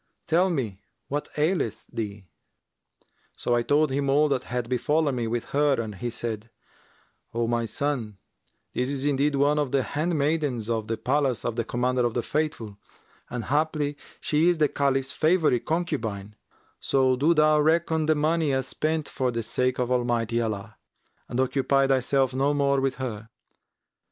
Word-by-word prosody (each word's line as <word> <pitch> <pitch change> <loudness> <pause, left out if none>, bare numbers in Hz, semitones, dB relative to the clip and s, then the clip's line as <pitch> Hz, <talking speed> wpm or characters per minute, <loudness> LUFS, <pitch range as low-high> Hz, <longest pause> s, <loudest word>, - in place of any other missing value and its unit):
Tell 175 +3 +3
me 115 - -3 0.3
what 145 +1 -2
aileth 155 - 0
thee.' 105 -3 -5 1.1
So 120 - -1
I 120 - +3
told 145 +4 +2
him 140 +1 0
all 150 +2 +4
that 130 -2 -1
had 125 -1 -3
befallen 145 +4 +1
me 120 -2 -2
with 115 +1 -3
her 145 -2 +2
and 110 -2 -3
he 110 +5 -4
said, 115 -2 -4 0.9
'O 120 0 +1
my 120 0 0
son, 120 -5 -2 0.6
this 125 +1 0
is 140 -1 -2
indeed 145 0 +2
one 145 +2 +3
of 145 -4 -1
the 135 -2 +2
handmaidens 145 -7 -1
of 110 -2 -1
the 115 +1 -2
palace 130 +1 0
of 115 - -1
the 115 - 0
Commander 125 +2 0
of 120 -2 0
the 120 - 0
Faithful 120 -10 -3 0.5
and 120 -2 -4
haply 150 0 0 0.2
she 155 +3 +2
is 175 - +2
the 155 -1 +4
Caliph's 135 -1 0
favourite 155 -6 +2
concubine: 115 - -2 0.4
so 130 -1 +2
do 155 +6 +3
thou 155 0 +4
reckon 160 0 +2
the 155 - +4
money 155 0 +1
as 130 0 0
spent 155 -1 -1
for 130 -2 -1
the 115 -1 -2
sake 125 +3 0
of 125 0 -1
Almighty 120 -2 0
Allah[FN#354] 110 -2 -2 0.6
and 125 - -2
occupy 135 +1 +2
thyself 135 0 +2
no 140 +3 +1
more 140 -1 +2
with 135 -1 0
her. 115 -4 -5
135 Hz, 165 wpm, -26 LUFS, 120-150 Hz, 1.1 s, all